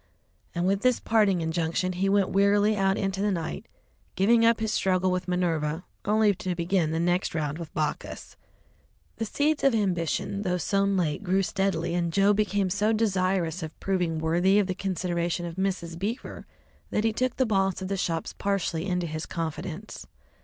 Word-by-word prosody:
And 175 +1 0
with 195 +1 +1
this 250 0 +3
parting 205 -5 +2
injunction 165 +2 -1
he 190 +2 0
went 200 -1 +3
wearily 205 +2 +3
out 195 0 +2
into 195 -1 -1
the 210 - +2
night, 165 - -3 0.5
giving 230 +4 +4
up 230 0 +4
his 220 -1 -1
struggle 185 -1 +2
with 180 0 -2
Minerva, 165 -3 -1 0.2
only 210 0 +3
to 185 -1 -3
begin 170 -1 +1
the 160 +1 -1
next 175 +1 0
round 150 0 -2
with 165 -2 -7
Bacchus. 150 -1 -3 0.8
The 225 - -2
seeds 295 +7 0
of 275 -4 +4
ambition, 195 0 -1
though 180 -3 0
sown 195 +3 +1
late, 160 -3 0
grew 190 0 +1
steadily, 190 -4 -1
and 170 -1 0
Joe 200 +4 +4
became 205 -2 0
so 210 +3 +2
desirous 185 -5 0
of 160 -1 -7
proving 180 -4 0
worthy 175 +5 +2
of 205 - +3
the 185 - -2
consideration 175 -2 -2
of 170 +1 -7
Mrs. 185 -3 -2
Beaver 220 +7 -5 0.4
that 210 - 0
he 225 -1 +1
took 255 +2 -1
the 260 - +2
boss 195 -4 +1
of 190 - -4
the 195 - -1
shops 165 -3 -2
partially 195 -3 -1
into 180 -2 0
his 155 -1 -5
confidence. 165 +4 -5
185 Hz, 180 wpm, -27 LUFS, 170-200 Hz, 0.8 s, giving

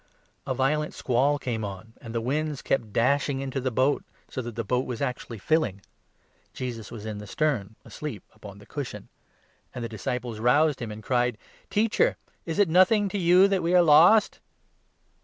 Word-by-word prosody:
A 130 - -1
violent 150 +4 0
squall 135 +3 +1
came 120 -5 -3
on, 100 +2 -7
and 115 - -8
the 115 - 0
waves 145 +3 -2
kept 115 -6 -1
dashing 140 +4 +1
into 135 0 -3
the 130 - 0
37 120 - -12
boat, 135 +3 +2 0.2
so 130 - -5
that 120 -2 -7
the 115 - -2
boat 125 +4 -1
was 120 -3 -4
actually 125 -3 -4
filling. 130 - 0 0.7
Jesus 120 -4 -5
was 110 -3 -9
in 105 -1 -5
the 105 - -9
38 - - -13
stern 115 -10 -1
asleep 145 -11 -7
upon 105 -2 -12
the 105 - -15
cushion; 125 -7 -7 0.7
and 125 - -4
the - - -2
disciples 120 +1 -4
roused 145 +5 +3
him 115 -2 -4
and 105 +1 -9
cried: 125 -1 +1 0.2
" - - -30
Teacher! 230 - +2 0.3
is 165 - -3
it 205 -2 +4
nothing 185 +5 +4
to 200 - -3
you 180 +2 +6
that 195 -2 0
we 170 +2 +1
are 180 - +7
lost 170 +8 +6
130 Hz, 195 wpm, -26 LUFS, 115-155 Hz, 0.7 s, are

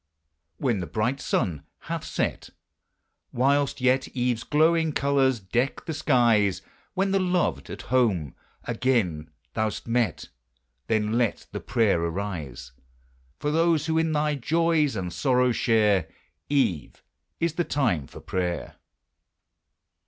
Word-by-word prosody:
When 120 -7 0
the 90 - -4
bright 120 +6 -1
sun 85 - -1 0.2
hath - - -4
set, - - -2 0.8
Whilst 140 +3 +1
yet 130 +1 +2
eve's 125 -3 -1
glowing 160 +1 +2
colors 135 -3 +2
deck 120 +8 -1
the 160 - -3
skies; 115 -10 +2 0.3
When 195 +1 +1
the 195 - +3
loved, 180 -1 0
at - - -7
home, 110 - +1 0.3
again 110 -11 0 0.2
thou 110 -1 +1
'st - - -7
met, 115 -6 0 0.6
Then 110 +1 +1
let 120 -3 0
the - - -4
prayer 105 -7 +1
arise 85 -8 -4 0.7
For 145 - -2
those 165 -1 +2
who 160 0 +1
in 160 0 +1
thy 150 0 +1
joys 155 0 +1
and 90 -3 -4
sorrow 125 +8 +2
share: 105 -7 +2 0.4
Eve 115 - 0 0.4
is 170 -2 0
the 175 - 0
time 105 - 0
for - - -12
prayer! 90 -2 -3
125 Hz, 130 wpm, -26 LUFS, 100-145 Hz, 0.8 s, the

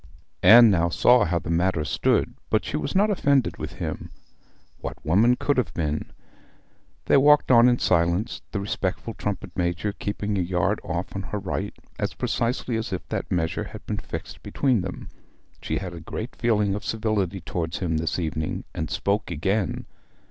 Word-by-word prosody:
Anne 115 +3 +9
now 85 -2 +2
saw 125 +7 +5
how 85 0 0
the 85 0 -4
matter 85 -2 +1
stood; 70 - +1 0.2
but - - +1
she - - -3
was 75 - -3
not 205 +2 +4
offended 140 - +2
with - - -6
him. - - -5 0.7
What - - -6
woman 105 +10 +4
could 145 +2 0
have 125 - -1
been? 75 -2 -2 0.9
They - - +5
walked 145 0 +5
on 120 0 +7
in 120 - +3
silence, 85 +5 +1
the 100 - -2
respectful 100 +2 -3
trumpet 105 -1 -4
major 90 +3 -1
keeping 100 0 -3
a - - +2
yard 90 +3 0
off 85 +3 -4
on 95 - -2
her 105 - -2
right 100 +1 -3 0.2
as - - -2
precisely 120 0 -1
as 110 -1 -4
if 95 - -4
that - - -3
measure 80 -2 -1
had - - -10
been - - -3
fixed - - -7
between 130 -7 +1
them. - - -6 0.5
She 80 - -2
had 90 -1 -5
a 85 - -7
great 110 +8 -6
feeling 105 -4 +1
of 105 - -4
civility 105 -4 -1
toward 80 -1 -3
him 80 -4 -1
this 80 -1 -1
evening, 80 -2 -3
and 80 -1 -3
spoke 100 +8 -1
again. 95 +5 -1
100 Hz, 175 wpm, -25 LUFS, 85-115 Hz, 0.9 s, Anne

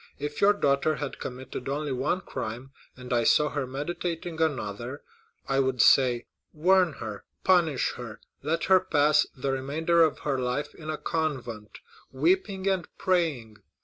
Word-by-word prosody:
If 145 +1 -5
your 205 +1 +6
daughter 145 -4 +1
had 145 -2 -5
committed 125 0 -6
only 145 +1 -2
one 135 +8 0
crime, 120 -2 -6 0.3
and 125 -1 -5
I 120 -1 +3
saw 150 +6 +4
her 145 -3 -3
meditating 165 +4 -4
another, 130 -3 -2 0.4
I 135 0 +1
would 130 -2 0
say 125 -2 +5 0.3
'Warn 180 +1 +3
her, 110 -6 -7 0.2
punish 170 -7 +3
her, 115 -3 -8 0.2
let 165 +2 -1
her 190 -1 +6
pass 150 -4 +3
the 135 +1 -1
remainder 155 +6 +1
of 160 -2 +3
her 140 -3 -1
life 130 +4 -2
in 155 -1 -9
a 155 - -2
convent, 130 -11 -3 0.3
weeping 190 +7 +1
and 190 -3 0
praying. 150 -12 0
145 Hz, 150 wpm, -27 LUFS, 130-165 Hz, 0.4 s, your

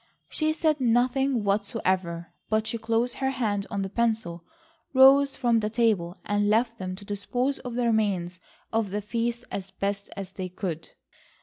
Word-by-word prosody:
She 310 -1 +1
said 310 -2 +1
nothing 245 +1 +2
whatsoever, 190 -5 -1 0.2
but 215 0 +1
she 230 - -2
closed 230 +2 0
her 265 0 0
hand 210 -6 -1
on 200 -1 -2
the 195 - -4
pencil, 220 -6 -1 0.5
rose 275 +1 +7
from 240 -4 +2
the 210 -1 -1
table, 215 -6 +1
and 205 0 +1
left 230 +2 +2
them 185 -1 -4
to 200 +2 -12
dispose 245 +7 -1
of 245 -2 -6
the 245 0 +1
remains 195 -6 0 0.3
of 225 -2 +1
the 205 +2 -3
feast 235 +2 -2
as 195 -1 -4
best 200 +1 -3 0.3
they 185 -1 -3
could. 175 -3 -5
220 Hz, 165 wpm, -26 LUFS, 195-245 Hz, 0.5 s, rose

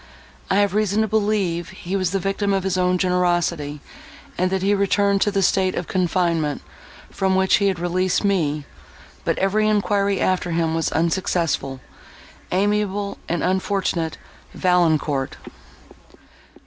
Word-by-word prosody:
I - - +2
have 200 -1 +2
reason 210 0 +1
to - - -1
believe 205 -5 0
he 185 +3 -5
was 185 -2 +1
the 195 - 0
victim 195 +1 -1
of 195 -1 0
his 190 -1 -1
own 180 0 +2
generosity, 175 -5 0 0.5
and 185 +1 +1
that 190 0 -1
he 200 +1 +3
returned 200 0 +2
to - - +3
the 195 -1 0
state 185 0 +2
of 175 - -3
confinement, 170 -4 0 0.5
from 190 -1 0
which 190 0 +4
he 200 - +1
had 190 -2 0
released 180 +3 0
me; 155 -7 0 0.6
but - - 0
every 210 +3 +1
enquiry 200 -1 +1
after 185 -1 0
him 165 -1 0
was 165 0 0
unsuccessful. 165 -5 -1 0.7
Amiable 205 +1 0
and 175 - -1
unfortunate 185 -3 -1 0.4
Valancourt!" 160 -6 +1
185 Hz, 140 wpm, -22 LUFS, 170-200 Hz, 0.7 s, which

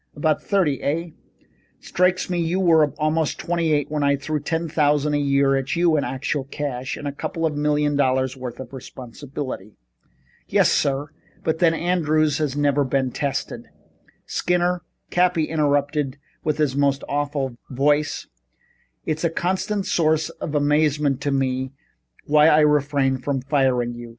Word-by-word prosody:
"About 155 0 +1
thirty, 180 -9 +1
eh? 165 +4 -1 0.7
Strikes 180 +1 +1
me 180 -1 -1
you 170 +2 0
were 165 -4 +5
about 155 +1 0
twenty 170 -2 -1
eight 145 -1 0
when 150 -1 -1
I 140 0 +3
threw 150 +2 -3
ten 165 +3 -2
thousand 150 -1 +2
a 145 - +2
year 140 -1 +2
at 135 +4 -1
you 170 -2 +3
in 145 - +1
actual 135 +1 -2
cash, 135 -3 -4
and 145 - -6
a - - -1
couple 165 +3 -3
of 155 -2 -1
million 150 0 +1
dollars' 130 -1 +1
worth 125 -2 -7
of 130 0 -9
responsibility." 130 -3 -7 0.7
"Yes - - +3
sir, 140 +1 0 0.3
but 160 0 -1
then 165 -2 +4
Andrews 155 -4 +1
has 145 -2 -1
never 145 -1 +2
been 130 -1 0
tested 140 +1 -3 0.3
" - - -34
"Skinner," 180 0 0 0.3
Cappy 175 -2 +2
interrupted 145 -2 0 0.3
in 155 - 0
his 145 -4 0
most 140 -1 +1
awful 145 -3 -2
voice, 145 +3 +1 0.8
"it's 155 +1 -2
a 170 - +3
constant 190 +4 -1
source 160 -2 +1
of 150 - -6
amazement 145 -1 +2
to 145 - -1
me 130 -1 -1 0.5
why 150 +1 +5
I 155 -1 +6
refrain 145 -3 +2
from 135 0 -2
firing 130 -4 +1
you. 120 0 -9
145 Hz, 155 wpm, -22 LUFS, 135-160 Hz, 0.8 s, I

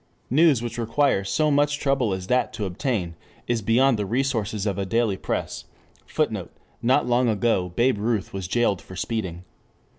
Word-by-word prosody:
News 145 -4 +4
which 120 0 -4
requires 115 -4 +1
so 155 -1 +2
much 145 +1 +2
trouble 135 -6 +1
as 95 -1 -3
that 125 +4 +1
to 105 - -3
obtain 95 - -2 0.3
is 120 -2 0
beyond 115 +3 +3
the 105 - -1
resources 110 -4 -1
of 100 -2 -1
a - - 0
daily 110 +1 +1
press. - - -4 0.4
[Footnote: - - -2 0.3
Not 130 +4 +3
long 120 0 +2
ago 100 -4 +1
Babe 120 -2 +2
Ruth 110 -2 -1
was 95 -2 -4
jailed 105 -2 +1
for 95 - -12
speeding. 95 -4 -3
115 Hz, 170 wpm, -24 LUFS, 100-130 Hz, 0.4 s, News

